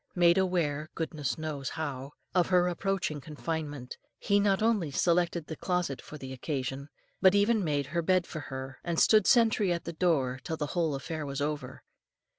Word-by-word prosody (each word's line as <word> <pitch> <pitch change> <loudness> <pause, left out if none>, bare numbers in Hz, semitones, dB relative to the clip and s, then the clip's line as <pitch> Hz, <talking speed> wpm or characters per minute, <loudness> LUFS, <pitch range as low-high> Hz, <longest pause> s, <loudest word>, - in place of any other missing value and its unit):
Made 175 +1 +5
aware, 155 -5 0
goodness 155 -4 -2
knows 150 -4 -4
how, 140 -3 -4 0.2
of 180 -1 +3
her 180 -1 +4
approaching 180 -4 -1
confinement, 150 -2 -5 0.2
he 205 0 +2
not 200 0 +2
only 215 -8 +2
selected 170 +2 +1
the 160 - -6
closet 180 -5 -1
for 155 - -10
the 130 -2 -7
occasion, 135 +1 -4 0.3
but 190 +1 +6
even 205 +1 +3
made 145 -4 0
her 170 - +2
bed 185 +1 +2
for 155 - -6
her, 135 -2 -7
and 170 -2 -1
stood 215 -3 +5
sentry 225 -6 +4
at 170 -1 -1
the 170 - -5
door 145 -7 +1
till 160 - -3
the 150 - -1
whole 165 -5 +1
affair 155 +3 -4
was 140 -1 -4
over. 150 0 -3
160 Hz, 180 wpm, -29 LUFS, 145-180 Hz, 0.3 s, but